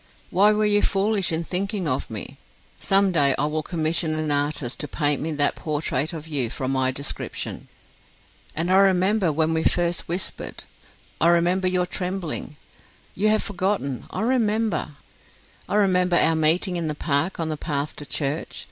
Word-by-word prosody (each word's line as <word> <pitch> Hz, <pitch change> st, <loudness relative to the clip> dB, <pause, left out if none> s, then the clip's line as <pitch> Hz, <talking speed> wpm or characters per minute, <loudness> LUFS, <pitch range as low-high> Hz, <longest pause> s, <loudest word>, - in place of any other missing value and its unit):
Why 200 Hz, +4 st, +5 dB
were 215 Hz, 0 st, +2 dB
you 205 Hz, 0 st, +3 dB
foolish 200 Hz, -1 st, +1 dB
in 165 Hz, +1 st, -1 dB
thinking 195 Hz, +1 st, -1 dB
of 130 Hz, -2 st, -1 dB
me? 110 Hz, -3 st, -6 dB, 0.4 s
Some 195 Hz, 0 st, +3 dB
day 140 Hz, -5 st, +3 dB
I 145 Hz, -, +1 dB
will 155 Hz, +1 st, -1 dB
commission 160 Hz, 0 st, 0 dB
an 155 Hz, -1 st, -1 dB
artist 145 Hz, -3 st, -1 dB
to 150 Hz, -, -2 dB
paint 145 Hz, -1 st, 0 dB
me 160 Hz, -, -2 dB
that 145 Hz, -1 st, +2 dB
portrait 150 Hz, -2 st, -2 dB
of 160 Hz, -2 st, -7 dB
you 140 Hz, -7 st, 0 dB
from 130 Hz, +3 st, -3 dB
my 130 Hz, -1 st, +2 dB
description. 135 Hz, +2 st, -4 dB, 0.9 s
And 170 Hz, +3 st, -1 dB
I 190 Hz, -, +5 dB
remember 190 Hz, -1 st, +3 dB
when 160 Hz, +2 st, +1 dB
we 160 Hz, -, +1 dB
first 175 Hz, -1 st, 0 dB
whispered... 175 Hz, +1 st, -4 dB, 0.6 s
I 165 Hz, -, +5 dB
remember 175 Hz, +2 st, +3 dB
your 180 Hz, -1 st, +1 dB
trembling. 180 Hz, -4 st, -4 dB, 0.6 s
You 205 Hz, +3 st, 0 dB
have 215 Hz, 0 st, +2 dB
forgotten 185 Hz, -9 st, -2 dB
I -, -, -4 dB
remember. 220 Hz, -, 0 dB, 0.8 s
I -, -, -1 dB
remember 180 Hz, -3 st, +3 dB
our 165 Hz, -1 st, +4 dB
meeting 170 Hz, +4 st, +2 dB
in 165 Hz, -2 st, -2 dB
the 150 Hz, -, -3 dB
park 155 Hz, +5 st, 0 dB
on 165 Hz, -1 st, -1 dB
the 155 Hz, -, -2 dB
path 145 Hz, -1 st, -3 dB
to 145 Hz, -, -7 dB
church. 145 Hz, +2 st, -2 dB
165 Hz, 170 wpm, -24 LUFS, 150-190 Hz, 0.9 s, Why